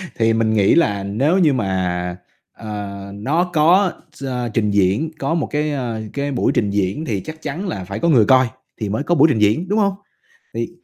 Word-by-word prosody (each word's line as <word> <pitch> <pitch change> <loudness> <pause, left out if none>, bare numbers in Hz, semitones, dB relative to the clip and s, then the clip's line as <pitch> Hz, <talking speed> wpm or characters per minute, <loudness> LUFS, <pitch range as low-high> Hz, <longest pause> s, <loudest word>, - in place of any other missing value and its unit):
Thì 115 -1 +2
mình 110 -1 +1
nghĩ 100 -2 +4
là 100 -12 +2
nếu 135 - +1
như 155 -6 +4
mà, 90 -5 -2 0.3
ờ, 105 -2 -7
nó 145 +12 0
có 175 +5 +4 0.3
ch 135 - -6 0.3
trình 105 -3 +1
diễn, 100 - +1
có 165 - -1
một 165 - -1
cái, 150 0 0
ờ, 120 -5 -3
cái 140 0 -2
buổi 125 - +1
trình 105 -3 +1
diễn 100 - -1
thì 105 -7 -2
chắc 160 0 -9
chắn 185 +8 -4
là 95 - -4
phải 100 +2 -6
có 170 - +1
người 120 -8 +5
coi 130 0 +5 0.3
thì 105 - -2
mới 110 +8 -1
có 175 - +1
buổi 160 - +6
trình 110 - 0
diễn, 110 - +2
đúng 210 +3 +1
hông? 200 -2 +2 0.6
Thì 115 +6 -3
115 Hz, 210 wpm, -19 LUFS, 100-155 Hz, 0.6 s, buổi